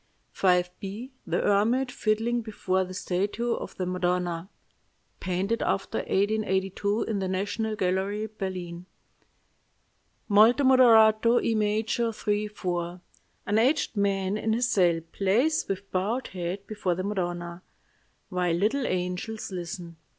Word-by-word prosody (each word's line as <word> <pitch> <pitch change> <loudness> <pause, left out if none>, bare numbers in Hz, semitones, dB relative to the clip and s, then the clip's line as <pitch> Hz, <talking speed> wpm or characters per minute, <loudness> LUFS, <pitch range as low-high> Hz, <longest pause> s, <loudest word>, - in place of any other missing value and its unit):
"V_b._ 190 +6 0 0.2
THE - - 0
HERMIT 230 +6 +2
FIDDLING 230 +2 0
BEFORE 190 -4 -1
THE 185 - -8
STATUE 200 +7 -1
OF - - -7
THE 185 - -2
MADONNA 180 -1 -1 0.7
(Painted 190 +5 -1
after 195 - -1
1882; 200 0 0
in 215 -3 -2
the 190 - -1
National 205 +4 -2
Gallery, 195 +2 -1
Berlin) 185 -4 -6 1.4
"Molto 220 +6 +5
moderato, 230 -3 +6
E 230 - +1
major, 220 +2 0
3 210 -1 -1
4. 175 -3 -3 0.5
An 210 +2 +2
aged 270 +1 +2
man 200 -1 0
in 220 0 0
his 245 +2 +1
cell 175 -8 +3
plays 235 +12 +1
with 195 0 -4
bowed 215 +7 -1
head 185 +2 -4
before 200 -5 -2
the 185 - -3
Madonna, 175 -3 -3 0.7
while 180 -3 0
little 225 +9 +1
angels 180 +5 -3
listen. 175 -2 -6
200 Hz, 120 wpm, -27 LUFS, 180-220 Hz, 1.4 s, moderato